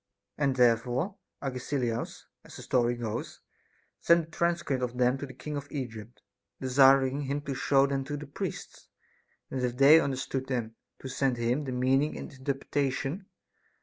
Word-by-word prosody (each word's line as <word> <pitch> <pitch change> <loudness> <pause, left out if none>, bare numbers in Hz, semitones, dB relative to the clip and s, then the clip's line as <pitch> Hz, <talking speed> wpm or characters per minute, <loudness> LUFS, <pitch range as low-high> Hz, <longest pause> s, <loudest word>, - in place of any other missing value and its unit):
And 140 -3 +1
therefore 125 - +2 0.3
Agesilaus, 125 -3 -3 0.2
as - - -13
the - - -9
story 120 -1 +2
goes, 115 -3 -5 0.6
sent 170 -1 +3
a - - -22
transcript 170 -6 0
of 125 0 -3
them 125 +1 +2
to 140 - -5
the 130 - -10
king 150 -1 -6
of 145 0 -6
Egypt, 120 -4 -7 0.4
desiring 135 +1 +4
him 140 +1 -2
to 140 -1 -4
show 135 +1 +3
them 135 -1 -1
to 145 +1 -4
the 150 - -7
priests, 140 - -6 0.6
and 130 - -2
if 125 -1 -1
they 145 +4 +8
understood 135 -2 -2
them, 120 -4 -2 0.3
to - - -4
send 130 -1 0
him 120 +5 0
the 130 - -3
meaning 130 +4 +1
and - - -8
interpretation. 140 +5 -2
135 Hz, 160 wpm, -29 LUFS, 125-145 Hz, 0.6 s, they